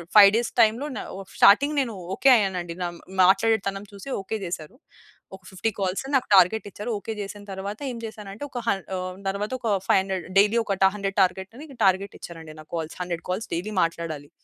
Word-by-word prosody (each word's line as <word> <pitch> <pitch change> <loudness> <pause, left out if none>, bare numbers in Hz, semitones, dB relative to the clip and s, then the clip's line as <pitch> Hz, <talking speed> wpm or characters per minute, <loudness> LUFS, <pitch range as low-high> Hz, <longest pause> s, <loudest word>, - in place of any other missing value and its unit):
5 200 -2 +10
days 235 0 -1
టైం‌లో 230 +6 +3
న - - -3 0.2
ఓ - - -7 0.2
starting 285 +9 +6
నేను 235 -5 -3 0.2
ఓకే 270 - +5
అయ్యానండి 180 -5 -2
నా 175 - -1 0.4
మాట్లాడేటితనం 195 0 +2
చూసి 200 +6 -9
ఓకే 205 +3 -4
జేసారు. 170 +5 -6 0.6
ఒక 190 - -16
50 190 +4 -1
కాల్స్ 190 +2 -1
నాకు 260 - +2
టార్గెట్ 195 +4 +4
ఇచ్చారు. 210 +4 -5
ఓకే 225 - -5
చేసిన 205 +1 -7
తర్వాత 195 +2 -5
ఏం 240 - -6
చేసానంటే, 210 0 -8
ఒక 250 - -5
హం 200 - +2 0.2
ఆహ్, 185 0 -5
తర్వాత 200 +3 -3
ఒక 225 -4 0
500 190 -1 +1
డైలీ 210 +3 +4
ఒక 195 -2 -1
టా - - +6
100 195 -1 -3
టార్గెట్ 190 +2 0
అని 305 +3 -9 0.2
టార్గెట్ 190 +1 +1
ఇచ్చారండి 160 -2 -9
నాకు 155 - -19
కాల్స్. 160 -1 -5
100 175 -2 -5
కాల్స్ 190 +5 -3
డైలీ 195 +6 -4
మాట్లాడాలి. 165 -3 -4
195 Hz, 185 wpm, -25 LUFS, 185-220 Hz, 0.6 s, 5